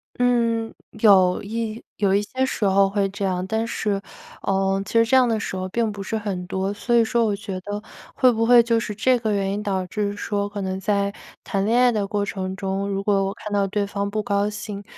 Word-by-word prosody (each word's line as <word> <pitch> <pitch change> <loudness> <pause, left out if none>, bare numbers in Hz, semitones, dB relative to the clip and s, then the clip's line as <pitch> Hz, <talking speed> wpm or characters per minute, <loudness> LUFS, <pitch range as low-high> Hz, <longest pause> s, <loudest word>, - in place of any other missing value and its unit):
嗯， 235 -2 +1 0.3
有 190 -4 +5
一 225 +1 -4
有 195 -2 +2
一 205 - +3
些 260 +5 -2
时 215 - -2
候 195 0 +4
会 200 -1 +1
这 200 +1 -6
样， 185 -1 -1
但 220 +3 -1
是， 205 -3 -1 0.4
呃， 195 0 +1
其 200 - -9
实 230 0 +5
这 260 - +2
样 250 -2 +5
的 220 -1 +1
时 195 - -4
候 185 0 -3
并 225 +2 0
不 200 -1 -7
是 220 +3 -2
很 195 -4 -4
多。 190 +2 -2
所 235 +3 -1
以 230 - +6
说 235 0 +1
我 210 -2 0
觉 195 -2 -6
得 205 +2 -5 0.3
会 255 -1 +5
不 225 0 0
会 240 0 +7
就 230 0 +2
是 210 -2 -4
这 250 +3 +2
个 220 -2 -1
原 195 -1 0
因 205 - -3
导 190 -3 -1
致 205 +2 -2
说 205 -1 -2
可 205 -1 -5
能 190 0 -3
在 200 0 0 0.3
谈 195 -2 -1
恋 230 +3 +2
爱 250 -1 +5
的 210 -3 -1
过 205 0 -1
程 190 -1 -4
中， 195 +1 -2
如 195 0 -2
果 195 -1 +2
我 195 - -2
看 210 -2 -7
到 200 -1 +2
对 205 +1 -1
方 200 0 -3
不 215 0 -2
高 200 0 +1
兴， 210 -1 -6
205 Hz, 255 characters per minute, -23 LUFS, 195-225 Hz, 0.4 s, 会